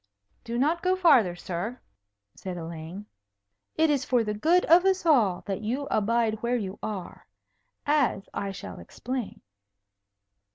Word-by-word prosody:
"Do 235 0 -4
not 310 +7 +1
go 370 0 +2
further, 275 - +4
sir," 185 +7 -5 0.5
said 185 -2 -7
Elaine. 165 +4 -7 0.7
"It 320 -1 +3
is 280 -3 +1
for 245 -2 +2
the 210 -1 -2
good 330 +12 +3
of 340 +3 +6
us 380 -2 +1
all 230 - +3
that 195 -1 -3
you 250 +6 -2
abide 220 0 +1
where 240 +1 +1
you 195 -3 -5
are. 205 -4 -6 0.6
As 285 -9 +1
I 200 -1 -3
shall 95 - -8
explain." 245 - -6
230 Hz, 140 wpm, -27 LUFS, 195-290 Hz, 0.7 s, of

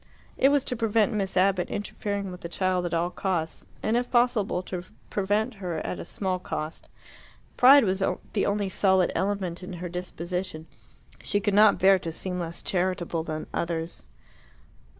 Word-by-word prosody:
It 270 - +4
was 285 -1 +2
to 250 - -2
prevent 225 -2 +2
Miss 195 -3 -1
Abbott 185 -1 +3
interfering 200 -1 -3
with 180 - -9
the 170 - -6
child 185 0 0
at 170 - -6
all 170 +2 0
costs, 170 -5 -2 0.2
and 220 - +1
if 245 +1 0
possible 240 -7 +2
to 180 -1 -5 0.3
prevent 205 +4 0
her 175 -3 -3
at - - -4
a - - -6
small 185 -2 -2
cost. 155 -3 -5 0.7
Pride 275 +2 +8
was 190 -1 0 0.3
the 205 - +1
only 205 0 0
solid 190 -1 +3
element 190 -3 -1
in 185 +1 -7
her 175 0 -5
disposition. 180 -1 -4 0.6
She 205 - 0
could 205 0 0
not 210 0 +6
bear 190 0 +5
to 165 - -5
seem 180 +2 -3
less 170 -1 -4
charitable 180 -2 -1
than 155 -1 -4
others. 170 0 -3
190 Hz, 170 wpm, -27 LUFS, 175-205 Hz, 0.7 s, Pride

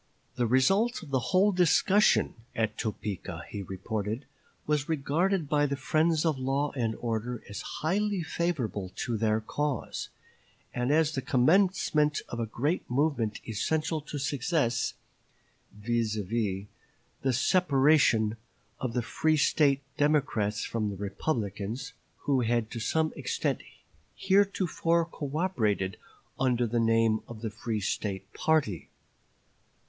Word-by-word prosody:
"The 120 -2 0
result 195 - +3
of 150 - -11
the 130 - +2
whole 195 +2 +4
discussion 185 +3 +4 0.2
at 110 -1 0
Topeka," 100 -6 -4
he 100 - -5
reported, 105 +5 -4 0.4
"was 150 -1 0
regarded 160 +4 +1
by 145 0 +2
the 140 - -1
friends 155 +4 +1
of 155 -5 +1
law 135 +3 0
and 115 -4 -1
order 115 0 -3
as 100 0 -6
highly 195 +3 -1
favorable 130 - -2
to 120 - -2
their 110 0 +1
cause, 145 +4 -3 0.6
and 125 +1 -1
as 155 0 +3
the 135 - -2
commencement 150 +1 +3
of 120 - -5
a 115 - -1
great 145 - -1
movement 125 -5 0
essential 155 +8 -1
to 150 0 -6
success; 140 -3 0 0.8
viz., 115 +1 -1
the 105 -2 -2 0.6
separation 135 - +3 0.4
of 125 -3 -3
the 120 - 0
free 155 +6 +1
State 140 -1 +3
Democrats 130 -8 +1
from 110 -2 -2
the 100 - -6
Republicans, 105 +3 -3 0.3
who 140 -3 +2
had 120 -1 0
to 115 - -4
some 155 +7 0
extent - - -1 0.5
heretofore 190 -4 +2
cooperated 140 - -1 0.4
under 125 -2 +2
the 120 +1 0
name 115 -1 +3
of 115 -2 -9
the 110 - -2
free 110 0 -3
State 100 -1 -3
party." 150 - 0
130 Hz, 125 wpm, -29 LUFS, 110-155 Hz, 0.8 s, whole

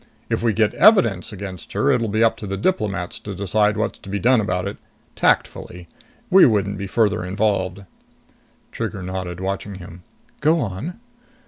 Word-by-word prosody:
If - - 0
we 115 -1 +2
get 110 0 +1
evidence 175 - +4
against 95 -3 -8
her, 140 +2 +2
it'll 120 -4 +1
be 110 +2 +1
up 115 - +3
to 105 - -7
the 95 0 -3
diplomats 100 - -1
to 100 -2 -7
decide 105 +2 +1
what's 110 - -2
to - - -12
be 100 - -1
done 120 +3 +3
about 90 -2 -2
it. 100 - -6 0.4
Tactfully. 90 -1 0 0.4
We 190 +1 +8
wouldn't 100 -3 0
be 100 - -4
further 105 -3 +1
involved." 95 0 -1 0.9
Trigger 95 - -4
nodded, 90 -1 -5
watching 100 +1 -4
him. 90 -1 -11 0.4
"Go 155 +3 +3
on." 120 - -4
100 Hz, 165 wpm, -21 LUFS, 95-110 Hz, 0.9 s, We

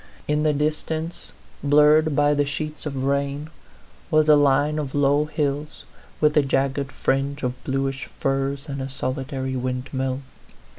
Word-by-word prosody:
In 150 0 +1
the 155 0 +3
distance, 155 +3 -2 0.3
blurred 150 +1 +5
by 145 0 +4
the 145 0 +2
sheets 150 +2 -4
of 135 -3 -3
rain, 140 +2 -1 0.6
was 155 -1 +3
a 150 - +8
line 145 +1 +3
of 140 -3 -4
low 145 +1 +3
hills, 150 -1 -3 0.4
with 150 0 +3
a 150 - +6
jagged 135 0 0
fringe 140 +2 -1
of 125 0 -3
bluish 135 0 -2
firs 135 +1 -1
and 140 -2 -4
a 135 - -4
solitary 130 0 -3
windmill. 130 +1 -2
140 Hz, 145 wpm, -23 LUFS, 135-150 Hz, 0.6 s, a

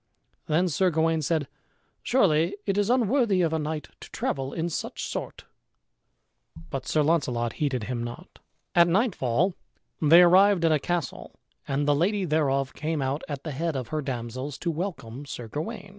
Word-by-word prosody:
Then 170 +4 +2
Sir 180 +3 +2
Gawain 160 0 +1
said, 155 -1 0 0.5
"Surely 185 -6 +2
it 195 - 0
is 205 +1 +1
unworthy 235 -5 +3
of 160 -1 +1
a 160 - +1
knight 150 0 -4
to - - -11
travel 135 -1 -2
in 165 0 -2
such 170 - -4
sort;" - - -6 1.3
but 130 -1 -4
Sir 155 - +2
Launcelot 125 -7 +1
heeded 135 -6 0
him 120 +1 -3
not. 120 0 -9 0.3
At 170 -1 +6
nightfall 175 - +1 0.5
they 165 +3 +8
arrived 185 0 +5
at 165 - +4
a 155 - +3
castle 175 +1 -3 0.3
and 145 +1 0
the 145 - +5
lady 190 +6 +1
thereof 140 -4 +1
came 155 -1 -2
out 135 +3 -1
at 140 -2 -5
the 155 - -4
head 160 +3 -2
of 130 -3 -4
her 155 -1 -2
damsels 130 +1 -5
to 170 - -2
welcome 145 - -5
Sir 120 -3 -6
Gawain. 195 - -5
155 Hz, 170 wpm, -26 LUFS, 135-175 Hz, 1.3 s, they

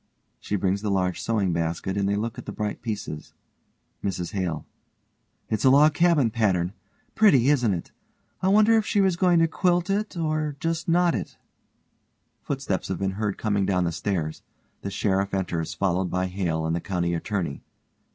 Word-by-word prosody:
(She 105 - -3
brings 95 0 0
the 105 - -2
large 90 -2 0
sewing 100 -6 0
basket 85 +3 -2
and 100 -1 0
they 100 - +1
look 110 +2 -3
at - - -10
the - - -3
bright 105 -1 -4
pieces.) 105 -9 -5 0.7
MRS 90 -3 -3
HALE: 90 -7 -3 0.8
It's 110 - -1
log 145 +3 +6
cabin 155 -8 +3
pattern. 95 -6 +1 0.4
Pretty, 140 - +5
isn't 125 -7 +3
it? 85 -3 -4 0.5
I 185 - +1
wonder 215 +3 +5
if - - -1
she 205 - +1
was 190 -3 +3
goin' 175 -1 +3
to 165 - +4
quilt 175 +2 +1
it 205 -1 -2
or 155 -2 -1
just 165 +1 -2
knot 175 0 +3
it? - - -5 1.0
(Footsteps 135 -9 -2
have 95 - -2
been 95 +1 -1
heard 105 +1 -2
coming 100 -2 0
down 90 -2 +2
the 85 - 0
stairs. 85 -2 -3 0.4
The 100 - -4
SHERIFF 100 0 0
enters 85 -4 -2
followed 95 -1 0
by 90 0 0
HALE 90 -4 -2
and 80 +1 0
the 85 - -2
COUNTY 85 -3 -1
ATTORNEY.) 85 -4 -3
100 Hz, 175 wpm, -25 LUFS, 90-150 Hz, 1.0 s, log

